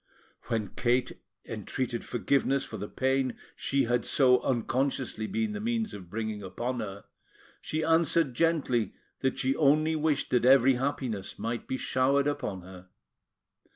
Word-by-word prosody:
When 110 -4 -2
Kate 125 +3 0 0.2
entreated 125 -3 -3
forgiveness 135 +2 +1
for 110 - -7
the 105 +1 -5
pain 130 0 0 0.2
she 140 0 +1
had 120 0 +1
so 125 -2 +4
unconsciously 130 -2 -1
been 220 +1 -1
the 205 - -4
means 225 0 -1
of 90 -3 -9
bringing 110 +1 -3
upon 120 +7 -3
her, 100 -2 -6 0.6
she 155 +1 -2
answered 160 -3 +3
gently 140 -6 +1 0.2
that 130 -1 0
she 130 +1 +1
only 155 +2 +3
wished 155 -2 0
that 125 - +3
every 130 +1 +6
happiness 125 -7 -3
might 115 +1 -4
be 130 - -2
showered 135 +2 +2
upon 125 -11 -2
her. 95 0 -12
130 Hz, 145 wpm, -29 LUFS, 115-145 Hz, 0.6 s, every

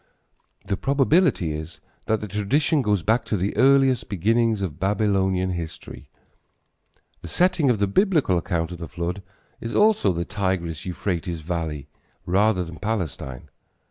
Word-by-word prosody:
The 100 -1 -1
probability 140 - +2
is 80 +2 -7 0.3
that 110 -1 +1
the 105 - -4
tradition 135 - +1
goes 105 -7 +1
back 115 +6 +2
to 105 - -1
the 95 +3 -2
earliest 135 +1 +4
beginnings 110 +2 +1
of 85 -5 -5
Babylonian 95 -2 +1
history. 85 -3 -7 1.1
The - - -8
setting 175 -5 +2
of 120 - +3
the 100 - +2
Biblical 155 - +2
accounts 85 0 -1
of 85 - -9
the 85 - -6
flood 85 +5 -4 0.4
is 115 0 -5
also 210 - +4
the 85 0 -2
Tigris 95 -5 -2
Euphrates 90 -2 -3
valley 80 -4 -4 0.4
rather 95 +1 +2
than 85 -1 -9
Palestine. 85 - -4
100 Hz, 140 wpm, -24 LUFS, 85-115 Hz, 1.1 s, earliest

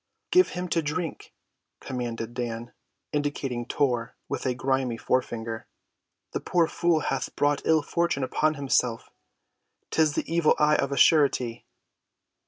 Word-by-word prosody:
"Give 365 +1 +5
him 180 0 -4
to 165 - +1
drink," 160 +2 -4 0.5
commanded 120 -2 -4
Dan, 120 -1 -4 0.4
indicating 140 -5 -2
Tor 125 -4 0
with - - -3
a 125 - 0
grimy 130 -1 0
forefinger. 115 -3 -2 0.6
"The - - -2
poor 175 -2 +2
fool 170 -1 +1
hath 135 - -2
brought 145 0 +1
ill‐fortune 160 -1 +1
upon 155 +4 +1
himself. 125 -4 0 0.8
'Tis 155 -2 +2
the - - -1
evil 165 -1 +3
eye 150 0 +4
of 140 - -1
a 140 - -2
surety." 130 -6 +3
140 Hz, 130 wpm, -26 LUFS, 120-155 Hz, 0.8 s, Give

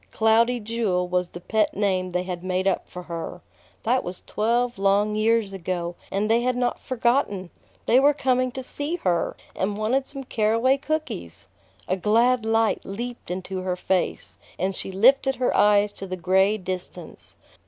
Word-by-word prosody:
"Cloudy 230 +2 +3
Jewel" 210 -5 -1
was 180 0 0
the 175 - -10
pet 215 +4 0
name 190 -3 0
they 180 0 -1
had 180 -1 -5
made 185 0 -1
up 190 - 0
for 180 - -8
her. 170 -2 -6 0.4
That 250 +3 +2
was 180 +1 -7
twelve 235 +2 0
long 200 +2 +2
years 215 -1 +1
ago, 175 -2 -3 0.2
and 200 +2 0
they 230 +2 +3
had 250 0 0
not 245 -1 -1
forgotten! 235 -7 0 0.3
They 250 - +5
were 285 +2 +4
coming 255 -2 +1
to 260 - -5
see 290 +6 -3
her, 180 - 0 0.2
and 200 +2 -1
wanted 255 +6 0
some 275 -1 -6
caraway 230 +3 +2
cookies! 95 - -4 0.4
A 185 - 0
glad 230 +4 +2
light 225 0 +2
leaped 240 +3 -6
into 185 +1 -4
her 185 -1 -1
face, 185 0 -2 0.2
and 190 +2 -1
she 190 - -3
lifted 265 +7 +4
her 250 0 0
eyes 205 0 +4
to 195 - -7
the 185 0 -4
gray 190 +4 +3
distance. 185 -2 -7
210 Hz, 170 wpm, -24 LUFS, 185-245 Hz, 0.4 s, They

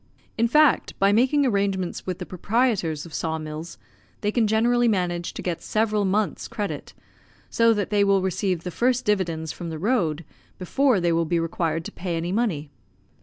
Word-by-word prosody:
In 230 +1 +2
fact, 300 +4 +3
by 195 +1 +4
making 265 +6 +3
arrangements 195 -7 -1
with 180 -2 -2
the - - -6
proprietors 190 - 0
of 165 - -12
saw 160 -1 -2
mills 155 +1 -7 0.4
they 210 - 0
can 225 -1 +2
generally 240 +3 +3
manage 175 -5 0
to - - -6
get 175 -3 -3
several 215 -1 0
months' 200 +2 0
credit, 200 -9 -5 0.6
so 230 0 +4
that 205 -1 -2
they 205 -1 +3
will 195 -1 +3
receive 185 -2 -1
the 180 - -4
first 250 +5 +1
dividends 165 -6 0
from 170 0 -7
the 160 - -5
road 175 - 0 0.3
before 250 +5 +2
they 175 -1 +1
will 165 0 +1
be 170 +1 0
required 165 -1 -2
to - - -6
pay 175 -2 -4
any 170 +2 -2
money. 180 -10 -1
190 Hz, 180 wpm, -24 LUFS, 165-220 Hz, 0.6 s, by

